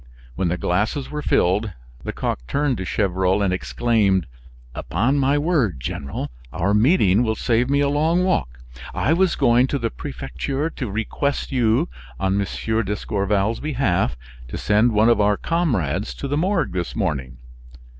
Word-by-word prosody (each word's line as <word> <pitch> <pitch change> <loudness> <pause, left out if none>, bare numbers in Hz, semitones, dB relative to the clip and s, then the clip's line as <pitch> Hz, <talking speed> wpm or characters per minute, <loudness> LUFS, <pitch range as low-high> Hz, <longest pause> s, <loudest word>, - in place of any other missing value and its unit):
When 90 +8 -1
the 85 +2 -1
glasses 105 +11 -1
were 150 0 -3
filled, 100 -3 +1 0.3
Lecoq - - -3
turned 140 -3 0
to 95 - -4
Gevrol 95 0 +1
and 95 -2 +1
exclaimed: 100 -2 +1 0.5
"Upon 135 +6 0
my 140 +2 +2
word, 145 - +1
General, 70 +2 -5 0.2
our 100 +4 0
meeting 105 - +4
will 110 -2 +1
save 120 +3 +1
me 140 +1 +2
a 140 - +3
long 160 +5 +2
walk. 60 - -1 0.3
I 155 - +2
was 185 +1 +2
going 120 +2 +4
to 140 - -1
the 120 -4 -2
prefecture 135 - -4
to 125 -6 -5
request 115 +7 -2
you, 115 -4 +2 0.3
on 95 +1 +1
M. 110 +3 -1
d'Escorval's 105 +1 -1
behalf, 105 - 0 0.3
to - - -6
send 105 +3 +3
one 110 +1 +4
of 115 -3 +4
our 105 0 +3
comrades 110 - -1
to 140 - -5
the 145 - -1
Morgue 175 +2 +1
this 90 -1 -3
morning. 70 - -2
110 Hz, 155 wpm, -22 LUFS, 95-140 Hz, 0.5 s, meeting